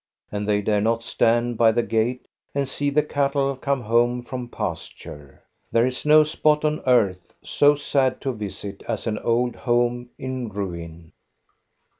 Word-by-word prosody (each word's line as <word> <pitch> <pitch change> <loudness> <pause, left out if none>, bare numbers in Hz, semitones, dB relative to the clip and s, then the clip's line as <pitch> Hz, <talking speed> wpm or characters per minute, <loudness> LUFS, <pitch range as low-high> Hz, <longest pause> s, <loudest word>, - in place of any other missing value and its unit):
And 105 0 -3
they 105 -1 +1
dare 105 0 +1
not 115 +2 0
stand 120 0 +1
by 115 -1 +6
the 120 +1 +1
gate 115 +3 -1 0.3
and 140 -1 0
see 145 +2 -1
the 150 +1 +2
cattle 140 -1 0
come 135 0 -1
home 120 +2 +1
from 125 -1 -6
pasture. 80 - -7 0.3
There 115 +1 +3
is 130 +3 -3
no 155 0 +7
spot 150 0 +1
on 150 0 0
earth 95 -8 +2
so 145 0 +4
sad 135 -2 0
to 135 -2 -2
visit 100 -2 -7
as - - -3
an 110 -2 -2
old 120 +1 0
home 120 0 0
in 130 -3 -4
ruin. 85 -5 -7
120 Hz, 160 wpm, -23 LUFS, 105-135 Hz, 0.3 s, no